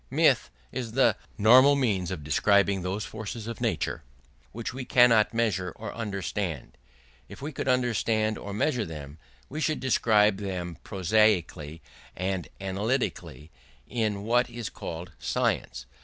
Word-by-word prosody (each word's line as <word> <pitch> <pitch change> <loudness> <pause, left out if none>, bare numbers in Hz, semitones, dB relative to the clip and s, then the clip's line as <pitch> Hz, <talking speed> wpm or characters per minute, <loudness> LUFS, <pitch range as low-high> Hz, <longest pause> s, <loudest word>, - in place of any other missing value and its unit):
Myth - - +3 0.2
is 115 -3 -5
the 135 +2 +4 0.2
normal 130 +6 +7
means 105 -10 0
of 85 -5 -5
describing 100 +6 +3
those 95 +4 -3
forces 110 +1 -6
of 115 0 -6
nature - - -1 0.5
which 115 +1 -5
we 130 0 -5
cannot 120 -4 +5
measure 105 -6 0
or 110 -2 -7
understand; 100 - -4 0.5
if - - -10
we 145 +3 -5
could 135 - -5
understand 115 -4 +1
or 100 - -7
measure 115 +4 0
them 75 -4 -8 0.3
we 155 +4 -5
should 155 -1 0
describe 110 -5 +3
them 90 -4 -5
prosaically 90 -5 +1 0.3
and 95 0 -2
analytically, 95 - -2 0.4
in 105 -4 -1
what 120 +3 +2
is 120 -3 -6
called 85 +2 -7
science. - - -1
105 Hz, 135 wpm, -27 LUFS, 95-115 Hz, 0.5 s, normal